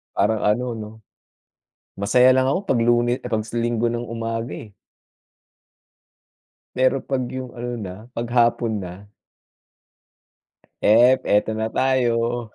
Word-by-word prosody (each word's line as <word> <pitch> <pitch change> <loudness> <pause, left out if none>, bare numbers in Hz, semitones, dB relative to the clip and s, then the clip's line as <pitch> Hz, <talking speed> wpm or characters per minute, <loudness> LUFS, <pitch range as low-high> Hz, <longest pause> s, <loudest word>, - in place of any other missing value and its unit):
Parang 110 -1 +1
ano, 110 +4 +1
'no, 105 0 -7 1.1
masaya 125 +5 +5
lang 130 0 +3
ako 140 +7 +1
'pag 125 - +2
Lune 120 +1 +2
ah, - - -5
'pag 110 -1 0
sa 115 +2 -6
Linggo 120 0 0
ng 120 0 -3
umaga, 115 +1 -4
eh. 105 -3 -11 2.0
Pero 130 +1 +2
'pag 130 -2 -2
'yong 130 -1 -6
ano 120 0 -5
na, 95 -3 -6 0.2
'pag 120 -1 -4
hapon 115 -2 +2
na 90 +3 -10 1.8
hep, 120 +5 +5
ito 105 +1 +1
na 110 0 -3
tayo. 120 -3 0
120 Hz, 130 wpm, -22 LUFS, 110-125 Hz, 2.0 s, masaya